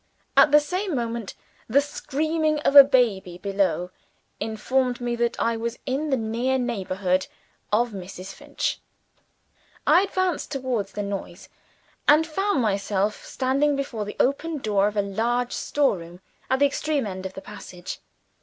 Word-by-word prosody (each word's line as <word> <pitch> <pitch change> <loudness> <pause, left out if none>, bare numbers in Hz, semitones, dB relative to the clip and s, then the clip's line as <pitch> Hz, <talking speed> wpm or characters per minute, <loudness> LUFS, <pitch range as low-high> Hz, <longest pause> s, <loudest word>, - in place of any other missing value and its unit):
At 300 - +7
the 295 - +8
same 365 +3 -2
moment, 235 -3 -3 0.3
the 265 +5 +5
screaming 305 +2 -1
of 280 - +1
a 280 - +13
baby 220 -10 +1
below, 185 -3 -1 0.5
informed 245 +3 0
me 240 -1 -2
that 235 0 0
I 230 0 +1
was 230 +1 -3
in 280 +4 -1
the 265 - +2
near 235 +4 0
neighborhood 190 -6 -1 0.4
of 235 +3 +2
Mrs. 190 -1 -8
Finch. - - -3 1.1
I 360 - +6
advanced 370 -6 -1
towards 255 -8 -2
the 205 - -3
noise, 200 -1 -6 0.6
and 300 +2 +6
found 325 -3 0
myself 200 0 0
standing 275 +3 +1
before 250 -6 -3
the 210 - -8
open 300 +4 +1
door 205 -6 +1
of 210 0 -4
a 205 - +3
large 235 +5 -1
store 280 -10 +1
room 170 +1 -11 0.3
at 260 - +3
the 285 - +4
extreme 285 -1 0
end 190 -2 -4
of 190 - -14
the - - -5
passage. 180 -4 -8
240 Hz, 155 wpm, -24 LUFS, 200-280 Hz, 1.1 s, a